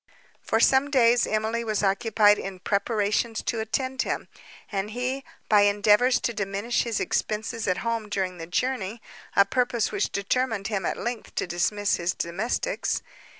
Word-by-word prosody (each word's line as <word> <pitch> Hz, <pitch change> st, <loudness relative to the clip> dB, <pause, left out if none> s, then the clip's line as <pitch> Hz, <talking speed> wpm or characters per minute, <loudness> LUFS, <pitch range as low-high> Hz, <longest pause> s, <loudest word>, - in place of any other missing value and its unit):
For 225 Hz, -, 0 dB
some 265 Hz, +4 st, +4 dB
days 245 Hz, -4 st, +4 dB
Emily 220 Hz, +2 st, -1 dB
was 215 Hz, -2 st, -1 dB
occupied 205 Hz, +1 st, +4 dB
in 195 Hz, -1 st, -6 dB
preparations 210 Hz, +2 st, 0 dB
to 230 Hz, -, -1 dB
attend 260 Hz, +4 st, -1 dB
him; -, -, -3 dB, 0.4 s
and 200 Hz, 0 st, -2 dB
he, 250 Hz, +4 st, -3 dB, 0.2 s
by 210 Hz, -2 st, +5 dB
endeavours 210 Hz, +5 st, +4 dB
to 235 Hz, -, -1 dB
diminish 200 Hz, +3 st, -1 dB
his 230 Hz, -3 st, -1 dB
expences 220 Hz, +1 st, -2 dB
at 185 Hz, -1 st, +1 dB
home 230 Hz, -2 st, -2 dB
during 185 Hz, -3 st, -2 dB
the 165 Hz, -, -6 dB
journey—a 215 Hz, -1 st, -1 dB
purpose 245 Hz, +1 st, 0 dB
which 400 Hz, -, -1 dB
determined 205 Hz, 0 st, -1 dB
him 195 Hz, -5 st, -1 dB
at -, -, -2 dB
length 240 Hz, -2 st, -5 dB
to -, -, 0 dB
dismiss 200 Hz, +4 st, 0 dB
his 175 Hz, +2 st, -1 dB
domestics. 185 Hz, +8 st, -2 dB
215 Hz, 150 wpm, -26 LUFS, 200-235 Hz, 0.4 s, by